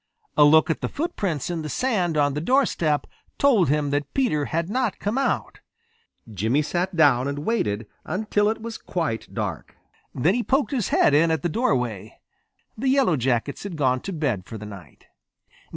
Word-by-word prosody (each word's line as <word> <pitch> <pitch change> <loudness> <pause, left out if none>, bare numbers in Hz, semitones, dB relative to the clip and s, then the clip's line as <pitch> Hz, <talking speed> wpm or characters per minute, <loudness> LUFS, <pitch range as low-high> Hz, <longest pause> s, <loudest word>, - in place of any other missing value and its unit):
A - - +6
look 155 +2 +5
at - - -3
the - - -2
footprints 190 - -2
in 170 -2 -3
the 155 - -5
sand 185 - 0
on 145 -1 +2
the 150 - -3
doorstep 170 - +1 0.3
told 230 - +4
him 145 -1 +1
that 145 0 -2
Peter 195 - +1
had 165 +3 -2
not 240 +1 -1
come 205 +3 -2
out. 270 0 -1 0.7
Jimmy 110 - +1
sat 175 +4 -2
down 140 -5 +4
and 145 +1 -4
waited 115 - -1 0.2
until 205 +1 0
it 220 0 -3
was 230 -1 -6
quite 160 -11 -3
dark. - - -5 0.4
Then 160 +9 +2
he 245 - 0
poked 270 +5 +1
his 245 -8 -1
head 145 - +3
in 160 +3 +4
at 160 +1 0
the 175 - +1
doorway. 125 - -1 0.6
The 260 +4 -1
Yellow 265 - +3
Jackets 130 +1 -1
had 195 -5 -6
gone 130 -3 +1
to 195 - -5
bed 135 - -2
for 115 - -7
the 105 - -8
night. 100 -4 -12
160 Hz, 185 wpm, -24 LUFS, 140-215 Hz, 0.7 s, A